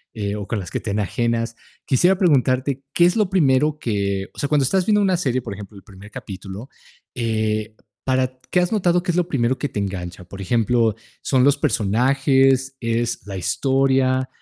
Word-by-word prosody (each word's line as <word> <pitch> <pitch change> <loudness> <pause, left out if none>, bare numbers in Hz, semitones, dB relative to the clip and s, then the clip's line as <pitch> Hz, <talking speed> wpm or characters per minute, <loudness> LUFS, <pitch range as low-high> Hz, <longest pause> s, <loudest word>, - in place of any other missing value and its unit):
eh, 100 -1 -3
o 105 -2 -6
con 115 - -2
las 90 -3 -7
que - - -2
te 110 - -6
enajenas, 115 +3 -1 0.3
quisiera 175 +8 +3
preguntarte, 135 -5 +2
¿qué 175 - +4
es 175 - +3
lo 210 -4 +1
primero 150 -4 +2
que? 100 -6 -2
O - - -12
sea, 145 - -1
cuando 150 -2 +3
estás 185 - +1
viendo 210 -1 +4
una 190 -2 +2
serie, 130 -7 -1
por 100 - -5
ejemplo, 100 0 -10
el 95 - -14
primer 100 0 -14
capítulo, 100 +5 -8 0.4
eh, 110 -3 -1 0.3
para 130 -1 0
¿qué 180 - +2
has 180 - +1
notado 180 -5 +2
qué 185 - 0
es 170 - -3
lo 175 - +1
primero 130 -5 0
que 145 - -2
te - - -4
engancha? 90 -3 -5
Por 95 +2 -9
ejemplo, 115 +1 +1 0.3
¿son 130 -2 +2
los 140 +1 +5
personajes, 135 +4 +2
es 115 -3 -1
la 95 -2 -5
historia, 130 +7 +1
125 Hz, 190 wpm, -21 LUFS, 105-140 Hz, 0.4 s, los